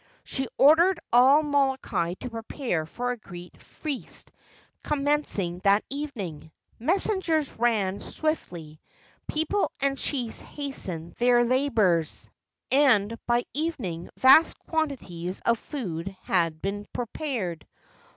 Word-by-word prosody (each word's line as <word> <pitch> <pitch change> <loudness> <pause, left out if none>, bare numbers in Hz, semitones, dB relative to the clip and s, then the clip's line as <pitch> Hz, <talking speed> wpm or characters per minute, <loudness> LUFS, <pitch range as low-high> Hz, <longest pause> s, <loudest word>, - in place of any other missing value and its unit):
She 270 -1 -2
ordered 330 +5 +6
all 265 +5 +6
Molokai 265 - 0
to 250 - -6
prepare 225 - -3
for 245 +8 -3
a 245 - -4
great 175 -5 -12
feast 290 -5 -6 0.5
commencing 280 -12 0
that 200 +2 +3
evening. 210 - -5 0.3
Messengers 335 - +1
ran 210 -5 +1
swiftly, 170 - -4 0.5
people 320 +7 0
and 275 0 +1
chiefs 245 -6 -1
hastened 185 - -5
their 240 0 +4
labors, 225 - +1 0.4
and'by 240 -3 +3
evening 245 - -3
vast 275 +5 +6
quantities 195 - -3
of 235 -1 +2
food 195 - -5
had 165 -4 0
been 205 +1 -3
prepared. 235 - -4
240 Hz, 100 wpm, -26 LUFS, 185-285 Hz, 0.5 s, ordered